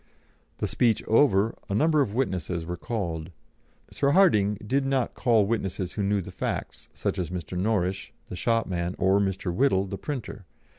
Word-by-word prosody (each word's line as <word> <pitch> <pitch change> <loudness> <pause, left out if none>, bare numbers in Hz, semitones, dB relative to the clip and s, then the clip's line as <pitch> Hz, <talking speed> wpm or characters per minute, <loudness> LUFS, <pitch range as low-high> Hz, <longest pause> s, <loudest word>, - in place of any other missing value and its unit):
The - - -1
speech 115 -3 +2
over, 110 -3 +3 0.2
a 100 - -1
number 155 +4 +3
of 110 -6 -1
witnesses 90 -9 -1
were 90 +1 -4
called. 85 -7 -4 0.6
Sir 140 0 +1
Hardinge 105 - +4
did 135 +4 +1
not 135 -2 0
call 115 -5 +3
witnesses 95 -4 -2
who 105 - -3
knew 100 0 +1
the - - -9
facts, - - -4
such - - -3
as 85 -3 -2
Mr. 90 0 -5
Norrish, 95 -1 -1
the - - -8
shopman, 90 -5 -1
or 95 +1 +3
Mr. 95 -2 -1
Whittle, 100 -4 +2
the 100 0 -6
printer. 115 - -6
100 Hz, 165 wpm, -26 LUFS, 90-120 Hz, 0.6 s, Hardinge